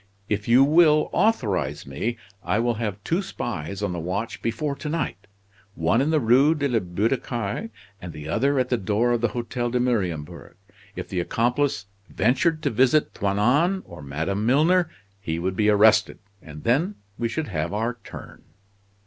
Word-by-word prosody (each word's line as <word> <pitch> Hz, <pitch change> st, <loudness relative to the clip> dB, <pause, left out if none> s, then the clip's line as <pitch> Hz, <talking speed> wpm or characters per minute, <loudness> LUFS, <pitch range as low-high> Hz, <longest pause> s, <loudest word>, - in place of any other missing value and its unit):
If 105 Hz, 0 st, -2 dB
you 125 Hz, +3 st, +6 dB
will 155 Hz, +1 st, +4 dB
authorize 95 Hz, -, 0 dB
me 110 Hz, -, -3 dB, 0.3 s
I 90 Hz, +4 st, 0 dB
will 120 Hz, +1 st, +1 dB
have 105 Hz, -4 st, -2 dB
two 170 Hz, -, 0 dB
spies 100 Hz, -, -5 dB
on 100 Hz, -3 st, -1 dB
the 85 Hz, -, -4 dB
watch 95 Hz, +7 st, -4 dB
before 140 Hz, +6 st, -2 dB
to 150 Hz, -, -5 dB
night, 150 Hz, -, -3 dB, 0.5 s
one 85 Hz, +9 st, +2 dB
in 145 Hz, -, +1 dB
the 160 Hz, -1 st, +3 dB
Rue 135 Hz, +6 st, +4 dB
de 145 Hz, -2 st, 0 dB
la 120 Hz, -4 st, +1 dB
Butte 100 Hz, +5 st, 0 dB
aux -, -, +1 dB
Cailles, 120 Hz, -, -4 dB, 0.3 s
and 90 Hz, -, -7 dB
the 75 Hz, -1 st, -9 dB
other 140 Hz, -, +1 dB
at 130 Hz, -1 st, +1 dB
the 125 Hz, -, +1 dB
door 110 Hz, +5 st, +1 dB
of 120 Hz, -1 st, +1 dB
the 120 Hz, -, +3 dB
Hotel 120 Hz, 0 st, -3 dB
de 125 Hz, +1 st, 0 dB
Mariembourg. 95 Hz, -12 st, -2 dB, 0.4 s
If -, -, -6 dB
the 95 Hz, -, -3 dB
accomplice 120 Hz, +3 st, 0 dB, 0.2 s
ventured 155 Hz, +5 st, +1 dB
to -, -, +1 dB
visit 130 Hz, +6 st, +3 dB
Toinon 125 Hz, -, +1 dB
or 85 Hz, -2 st, -11 dB
Madame 80 Hz, +9 st, -3 dB
Milner 160 Hz, +8 st, +3 dB, 0.3 s
he 80 Hz, -5 st, -3 dB
would 95 Hz, +2 st, -2 dB
be 105 Hz, +2 st, +2 dB
arrested; 110 Hz, +1 st, +4 dB, 0.2 s
and 75 Hz, -1 st, -11 dB
then 155 Hz, -, +1 dB, 0.2 s
we 115 Hz, -1 st, 0 dB
should 155 Hz, +2 st, -3 dB
have 85 Hz, -2 st, -2 dB
our 115 Hz, +4 st, -2 dB
turn!" -, -, -11 dB
115 Hz, 180 wpm, -24 LUFS, 95-140 Hz, 0.5 s, you